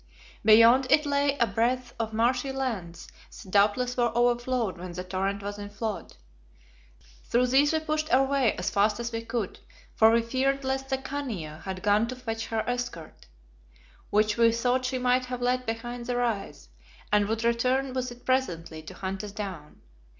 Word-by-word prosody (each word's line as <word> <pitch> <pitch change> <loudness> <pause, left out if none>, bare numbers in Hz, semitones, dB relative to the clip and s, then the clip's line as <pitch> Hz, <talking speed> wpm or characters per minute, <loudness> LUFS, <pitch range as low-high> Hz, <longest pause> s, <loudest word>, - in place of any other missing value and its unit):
Beyond 230 +4 +7
it 300 +1 +5
lay 285 0 +1
a 235 - +3
breadth 240 +3 -1
of 225 -1 -2
marshy 245 +4 +1
lands, 220 -11 -4 0.2
that 190 - -12
doubtless 215 +5 +2
were 240 -1 +2
overflowed 240 -4 +1
when 180 0 -7
the 180 +1 -5
torrent 195 +2 -2
was 205 +1 -5
in 205 0 -6
flood. 215 0 -5 1.1
Through 245 +2 +2
these 285 +2 +5
we 315 -1 0
pushed 310 0 -2
our 265 +1 +5
way 270 -4 +2
as 180 - -2
fast 210 +3 +2
as 235 0 -3
we 225 0 -3
could, 230 -4 -4 0.3
for 220 - +6
we 230 0 +3
feared 270 +3 0
lest 265 0 -2
the 265 - +1
Khania 250 - -5
had 190 -1 -5
gone 210 +2 +3
to 255 - -5
fetch 225 -3 -5
her 225 -1 -2
escort, 245 - -5 0.8
which 210 +1 +2
we 230 -1 +5
thought 245 +2 0
she 255 0 -1
might 250 0 +2
have 250 0 -5
left 250 0 0
behind 240 +1 -4
the 245 - -1
rise, 210 - -2 0.4
and 205 -1 +4
would 225 +1 -2
return 255 +3 +1
with 255 -1 -2
it 240 0 -13
presently 170 -12 -1
to 155 - -11
hunt 190 +1 -4
us 210 - -6
down. 190 -8 -7
235 Hz, 180 wpm, -27 LUFS, 205-255 Hz, 1.1 s, Beyond